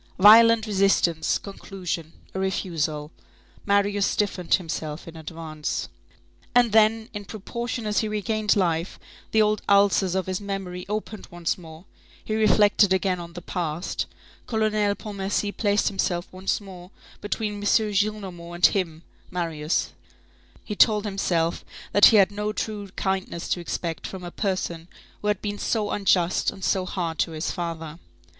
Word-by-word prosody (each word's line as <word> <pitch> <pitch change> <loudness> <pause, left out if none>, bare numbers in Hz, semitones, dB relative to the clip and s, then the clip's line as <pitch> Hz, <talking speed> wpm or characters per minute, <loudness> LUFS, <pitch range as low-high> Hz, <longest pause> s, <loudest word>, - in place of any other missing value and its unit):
Violent 225 +3 +8
resistance; 195 -5 +2
conclusion: 180 -5 -6 0.2
a 190 - -3
refusal. 160 -5 -2 0.6
Marius 200 0 +2
stiffened 195 -4 +1
himself 155 -3 -5
in 165 - -9
advance. 160 -1 -5 0.7
And 245 -2 +5
then, 220 +1 +4
in 205 -1 -5
proportion 235 +3 -5
as 210 0 +1
he 220 - 0
regained 215 0 0
life, 170 -3 0 0.3
the 220 -1 +4
old 210 0 +1
ulcers 200 -2 +4
of 190 -2 0
his 185 +1 -3
memory 190 -3 -5
opened 215 0 -4
once 175 -1 -2
more, 165 0 -12 0.4
he 215 - -2
reflected 210 -2 +4
again 190 -1 +1
on 170 0 -8
the 175 -1 -8
past, 170 -1 -3 0.4
Colonel 215 -2 +1
Pontmercy 205 0 -2
placed 205 -1 +2
himself 180 -3 -1
once 185 +1 -1
more 185 -3 -11 0.3
between 210 0 -2
M. - - -7
Gillenormand 205 -5 0
and 175 - +4
him, 170 -5 +1 0.3
Marius, 165 -3 -1 0.7
he 210 - -5
told 210 0 +4
himself 175 -4 0 0.3
that 205 - +7
he 220 - +8
had 195 -1 +5
no 210 +1 -2
true 210 -1 -4
kindness 190 -3 -2
to - - 0
expect 170 -1 -4
from 190 -2 -8
a 175 - -6
person 175 -4 -2 0.3
who 210 - -3
had 210 -2 0
been 205 -1 -3
so 215 -3 0
unjust 185 -3 +2
and 195 - -9
so 185 -1 +1
hard 165 -4 -3
to 165 - 0
his 155 +1 -2
father. 165 -2 -5
195 Hz, 150 wpm, -25 LUFS, 175-210 Hz, 0.7 s, Violent